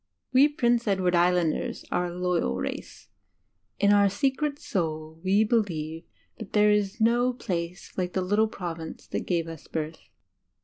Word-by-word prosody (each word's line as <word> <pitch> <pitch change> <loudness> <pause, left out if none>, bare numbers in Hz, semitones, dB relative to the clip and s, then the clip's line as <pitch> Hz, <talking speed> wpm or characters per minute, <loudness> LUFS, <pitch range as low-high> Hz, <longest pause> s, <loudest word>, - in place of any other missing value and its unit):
We 270 +3 +7
Prince 240 -5 +1
Edward 190 -3 +2
Island 175 -2 +3
ers - - -5
are 180 - +1
a 175 0 -7
loyal 180 - 0
race. - - -6 0.7
In 200 0 +4
our 200 -1 +5
secret 280 +6 0
soul 160 - -3
we 195 +3 +4
believe 170 -8 -1 0.3
that - - -9
there 210 0 +5
is 210 +1 0
no 240 +3 +3
place 180 -5 -5
like 180 -1 -2
the 185 - 0
litde 210 +4 +2
Province 165 -3 -6
that - - -4
gave 170 -2 0
us 165 -2 -9
birth. 160 0 -4
185 Hz, 160 wpm, -27 LUFS, 170-220 Hz, 0.7 s, We